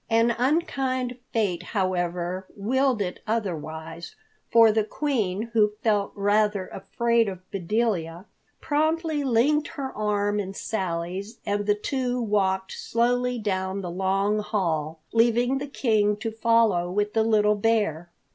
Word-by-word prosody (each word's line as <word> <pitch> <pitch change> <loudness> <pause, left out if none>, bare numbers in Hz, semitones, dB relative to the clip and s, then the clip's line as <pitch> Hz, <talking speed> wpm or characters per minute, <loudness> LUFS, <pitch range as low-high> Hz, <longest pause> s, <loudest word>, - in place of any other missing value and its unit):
An 230 +1 +4
unkind 260 -3 0
fate, 195 -7 0
however, 180 -1 -2
willed 250 +2 +1
it 180 -1 -5
otherwise, 165 -6 -4 0.4
for 230 -1 +7
the 220 0 +2
Queen, 220 -4 -2
who 210 -2 +3
felt 205 -3 +1
rather 205 -1 +2
afraid 230 +3 0
of 185 -1 -9
Bedelia, 190 -3 -1 0.3
promptly 315 0 0
linked 275 +4 +2
her 275 -5 -6
arm 205 -1 0
in 195 -1 -4
Sally's 190 +2 -3
and 205 0 -1
the 205 - +4
two 250 +2 -2
walked 190 -4 0
slowly 245 +1 0
down 190 -2 -2
the 175 -2 -5
long 195 +3 +1
hall, 160 -7 -2
leaving 240 +3 +3
the 285 - -5
King 215 -6 +1
to 225 +1 -4
follow 220 -6 +2
with 205 +3 -1
the 225 - +3
little 210 -1 +3
bear. 205 -6 0
210 Hz, 130 wpm, -25 LUFS, 190-235 Hz, 0.4 s, for